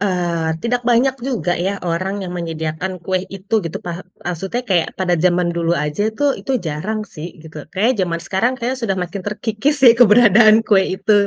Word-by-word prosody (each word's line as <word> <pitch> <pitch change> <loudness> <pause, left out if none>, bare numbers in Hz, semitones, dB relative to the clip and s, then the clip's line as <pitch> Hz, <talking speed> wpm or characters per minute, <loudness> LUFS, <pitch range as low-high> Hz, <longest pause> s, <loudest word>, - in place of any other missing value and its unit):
eee, 170 -4 -1
tidak 245 +1 +1
banyak 250 +3 +3 0.2
juga 225 -9 -1
ya, 190 +3 -1
orang 190 +3 -2
yang 180 - -6
menyediakan 165 +1 -4
kue 185 -1 0
itu 195 +3 -5
gitu, 165 -3 -5
paha 175 0 -5 0.2
maksudnya 195 +8 -3
kayak 185 -8 +1
pada 185 -2 0
zaman 175 -1 +2
dulu 170 0 0
aja 150 +8 -1
itu 220 +7 -3 0.2
itu 270 - -3
jarang 210 +9 -3
sih 160 -4 -8
gitu, 160 -1 -13
kayaknya 200 0 0
zaman 170 0 -3
sekarang 225 +7 +1
kayaknya 250 +2 -2
sudah 195 -5 -1
makin 180 +3 -5
terkikis 215 +8 -1
deh 235 - +10
keberadaan 220 -1 +7
kue 200 -3 +4 0.2
itu, 200 +3 +1
190 Hz, 180 wpm, -19 LUFS, 170-220 Hz, 0.2 s, deh